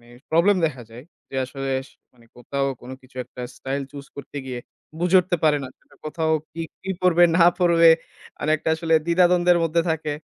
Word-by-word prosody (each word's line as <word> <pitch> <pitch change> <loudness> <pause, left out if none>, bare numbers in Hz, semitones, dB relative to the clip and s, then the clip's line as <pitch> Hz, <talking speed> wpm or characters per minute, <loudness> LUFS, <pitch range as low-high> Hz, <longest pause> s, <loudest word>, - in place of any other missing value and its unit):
অ্যা 120 +1 -17
problem 175 +5 +4
দেখা 135 -6 -6
যায়। 120 +3 -11 0.2
যে, - - -13
আসলে 135 +1 -6 0.2
স - - -23 0.5
কোথাও 135 +3 -2
কোন 125 - -11
কিছু 130 0 -21
একটা 125 - -12 0.2
স্টাইল 135 +1 -3
চুস 140 0 -10
করতে 140 +1 -10
গিয়ে 125 -2 -5 0.4
বুঝে 180 +2 +4
উঠতে 180 0 -2
পারে 150 -1 +4
না। - - -7
সেটা - - -25
কোথাও 160 +1 -1 0.2
কি, 165 - -7 0.2
কি 190 - -4
পড়বে 175 -1 +5
না 170 - +6
পড়বে, 170 -2 +5 0.5
মানে 150 - -2
একটা 155 - -4
আসলে 160 0 0
দ্বিধাদ্বন্দ্বের 175 0 +4
মধ্যে 165 +1 +1
থাকে। 160 -2 -2
160 Hz, 185 wpm, -23 LUFS, 135-175 Hz, 0.5 s, না